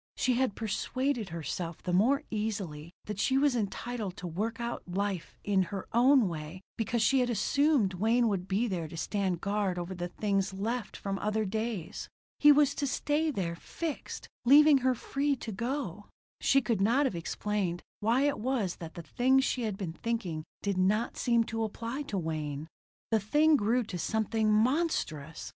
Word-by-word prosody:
She 255 - +2
had 245 -4 +1
persuaded 240 +1 -1
herself 165 0 -5
the 180 - -2
more 245 +10 +3
easily 195 -8 -3
that 210 -2 -5
she 265 +5 +2
was 280 -2 +3
entitled 215 -2 -3
to 180 - -7
work 215 +7 -3
out 235 0 -3
her 175 - -8
life 200 -4 -2
in 200 -2 +2
her 195 -2 -5
own 250 0 +5
way 160 +2 -6
because 225 +1 0
she 270 +4 +4
had 250 -1 +1
assumed 245 -1 +2
Wayne 225 +6 +2
would 190 -4 -1
be 205 +5 +1
there 175 -6 -2
to 165 - -9
stand 185 +1 -1
guard 200 -2 0
over 175 +1 -4
the 175 -1 -4
things 195 0 -1
left 225 +4 -3
from 195 -1 -3
other 215 +1 0
days. 215 -3 -3 0.3
He 295 - +8
was 290 -1 +5
to 280 - +1
stay 300 +4 0
there, 185 - -2
fixed, 315 - -5 0.2
leaving 285 +3 +7
her 255 0 +2
free 280 +4 0
to 230 -3 -6
go. 215 - -3 0.3
She 275 - +4
could 215 -3 0
not 240 +8 +3
have 255 - -1
explained 180 +1 -2 0.2
why 230 +5 +2
it 285 0 +1
was 225 -6 -1
that 165 -1 -9
the 170 - -7
things 260 +9 +3
she 255 - -1
had 215 -4 -2
been 180 -5 -4
thinking 185 -7 -3 0.2
did 200 -2 0
not 210 +5 +1
seem 235 -1 +2
to 225 0 -3
apply 230 +5 -4
to 200 - -2
Wayne. 155 -3 -3 0.4
The 220 - +4
thing 300 +10 +4
grew 240 +1 +2
to 190 -5 -6
something 220 +3 +1
monstrous. 215 - 0
215 Hz, 180 wpm, -30 LUFS, 185-250 Hz, 0.4 s, He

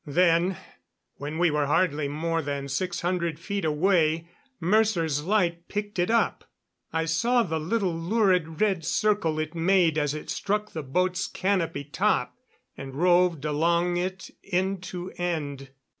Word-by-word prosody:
Then, 170 +3 +3 0.6
when 150 +2 -5
we 175 -1 +3
were 150 -1 +1
hardly 150 -1 +1
more 165 +3 -1
than 140 -1 -4
six 175 +6 -2
hundred 170 -3 -1
feet 200 +2 -3
away, 160 0 +2 0.3
Mercer's 170 -6 +2
light 175 -4 +1
picked 205 -2 -4
it 175 +3 +1
up. 230 0 +1 0.5
I 160 0 0
saw 235 +10 +2
the 160 -5 -2
little 185 +3 0
lurid 175 -2 +1
red 195 -6 +2
circle 205 -7 +1
it 155 +1 -3
made 170 -2 +3
as 145 0 0
it 155 - -6
struck 210 +1 -2
the 160 - -4
boat's 180 +6 0
canopy 185 -7 -1
top, 145 - 0 0.4
and 135 -1 -8
roved 175 -2 +3
along 170 +4 +1
it 185 +1 -4
end 190 0 -1
to 180 0 -6
end. 145 -6 -3
170 Hz, 145 wpm, -26 LUFS, 155-185 Hz, 0.6 s, Then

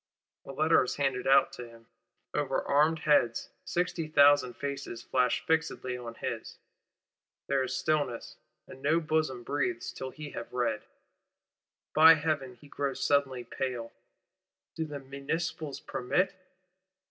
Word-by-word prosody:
A - - -7
Letter 155 +2 +4
is 125 - -3
handed 135 -3 -1
out 135 +1 +5
to 120 -1 -8
him, 115 0 -17 0.5
over 140 -3 0
armed 150 +3 +3
heads; 145 -6 +2
sixty 175 -2 -1
thousand 145 -5 +5
faces 140 -2 -5
flash 125 -2 +1
fixedly 160 -6 0
on 120 -2 -7
his, - - -5 0.9
there 140 -1 +1
is 130 0 -2
stillness 140 -4 -1 0.3
and 130 - -12
no 155 +4 +3
bosom 155 -6 -1
breathes, 120 -4 -2
till 130 - -5
he 150 +1 -9
have 120 - -7
read. 125 -1 0 1.1
By 160 +1 +9
Heaven, 150 -5 -2
he 145 - -16
grows 140 -1 -3
suddenly 135 -3 +2
pale! 125 -3 -4 0.8
Do 160 - -2
the 150 -2 -6
Municipals 140 +2 -4
permit? 135 +10 0
140 Hz, 135 wpm, -30 LUFS, 125-155 Hz, 1.1 s, By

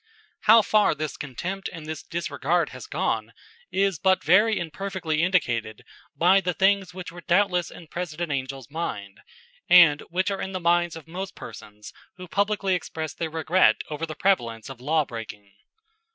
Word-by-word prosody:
How 220 +1 +8
far 210 -7 +3
this 155 -1 -4
contempt 180 +8 -5
and 165 -3 -9
this 155 -1 -5
disregard 170 0 -1
has - - -10
gone - - -2 0.4
is 195 -4 +1
but 190 +1 +2
very 210 +6 +4
imperfectly 170 -2 -3
indicated 120 - 0 0.3
by 185 +3 +4
the 180 -2 -2
things 195 -1 +2
which 180 -1 -8
were 175 +1 -11
doubtless 180 -1 +2
in 175 - -12
President 170 0 -4
Angell's 135 -1 -4
mind, 100 -12 -5 0.5
and 165 -5 +7
which 185 +3 0
are 195 - -3
in 190 - -4
the 185 - -2
minds 175 -1 +2
of 160 -1 -11
most 185 +3 -6
persons 105 -1 -11 0.2
who 180 0 -9
publicly 200 +1 0
express 160 -2 -4
their 165 - -4
regret 165 +3 +3 0.2
over 155 +2 -3
the 155 - -7
prevalence 120 - 0
of 130 -2 -10
law 155 +3 +1
breaking. 110 -4 -9
170 Hz, 165 wpm, -25 LUFS, 150-190 Hz, 0.5 s, How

